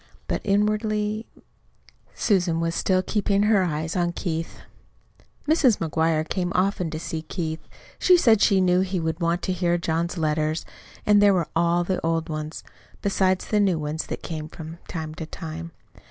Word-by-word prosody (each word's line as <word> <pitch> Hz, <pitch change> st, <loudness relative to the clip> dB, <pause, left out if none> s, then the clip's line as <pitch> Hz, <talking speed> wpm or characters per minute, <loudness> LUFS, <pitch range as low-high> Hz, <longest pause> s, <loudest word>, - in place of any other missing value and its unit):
But -, -, -1 dB
inwardly 210 Hz, +1 st, 0 dB, 0.9 s
Susan 180 Hz, -5 st, +1 dB
was 165 Hz, 0 st, 0 dB
still 185 Hz, +1 st, +1 dB
keeping 200 Hz, 0 st, +1 dB
her 210 Hz, -2 st, +4 dB
eyes 160 Hz, -1 st, -2 dB
on 175 Hz, -1 st, +1 dB
Keith. 165 Hz, -2 st, -4 dB, 0.9 s
Mrs. 285 Hz, -8 st, +4 dB
McGuire 160 Hz, 0 st, 0 dB
came 180 Hz, -2 st, -1 dB
often 185 Hz, -2 st, +1 dB
to 155 Hz, 0 st, -5 dB
see 160 Hz, -1 st, -4 dB
Keith. 160 Hz, 0 st, -4 dB, 0.4 s
She 365 Hz, -1 st, +6 dB
said 225 Hz, -10 st, +4 dB
she 195 Hz, -3 st, +4 dB
knew 180 Hz, 0 st, +3 dB
he 190 Hz, -1 st, -1 dB
would 160 Hz, 0 st, -2 dB
want 170 Hz, +2 st, 0 dB
to 185 Hz, -, 0 dB
hear 175 Hz, -1 st, +1 dB
John's 170 Hz, +1 st, -1 dB
letters. 155 Hz, 0 st, 0 dB, 0.4 s
And 205 Hz, -1 st, +5 dB
there 200 Hz, -1 st, +6 dB
were 170 Hz, -4 st, 0 dB
all 170 Hz, +1 st, +2 dB
the 185 Hz, +1 st, -2 dB
old 165 Hz, 0 st, 0 dB
ones, 155 Hz, 0 st, -5 dB, 0.4 s
besides 190 Hz, -2 st, +1 dB
the 210 Hz, -, +1 dB
new 190 Hz, -4 st, +3 dB
ones 155 Hz, +1 st, -3 dB
that -, -, -5 dB
came 155 Hz, -2 st, -5 dB
from 165 Hz, 0 st, -9 dB
time 160 Hz, -2 st, -5 dB
to 160 Hz, 0 st, -7 dB
time. 165 Hz, 0 st, -7 dB
175 Hz, 170 wpm, -24 LUFS, 160-195 Hz, 0.9 s, She